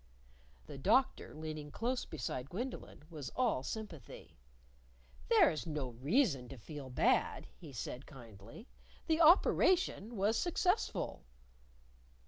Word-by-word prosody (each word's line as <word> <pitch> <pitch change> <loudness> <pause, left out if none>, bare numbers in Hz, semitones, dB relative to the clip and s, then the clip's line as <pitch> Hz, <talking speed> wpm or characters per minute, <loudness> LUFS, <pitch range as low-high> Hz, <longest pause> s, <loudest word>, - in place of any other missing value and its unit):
The 135 - -9
Doctor, 240 - +2
leaning 155 -1 -6
close 245 - -2
beside 135 -4 -5
Gwendolyn, 240 - -6
was 150 -5 -6
all 235 - +1
sympathy. 165 - -8 0.9
"There - - +6
is 155 +2 -5
no 150 -5 -3
reason 140 - +1
to 135 - -9
feel 140 +3 -8
bad," 125 - +1
he 160 -5 -12
said 125 +2 -6
kindly. 115 - -12 0.4
"The 320 0 +2
operation 330 - +4
was 205 +4 +2
successful." 365 +3 0
155 Hz, 110 wpm, -35 LUFS, -, 0.9 s, There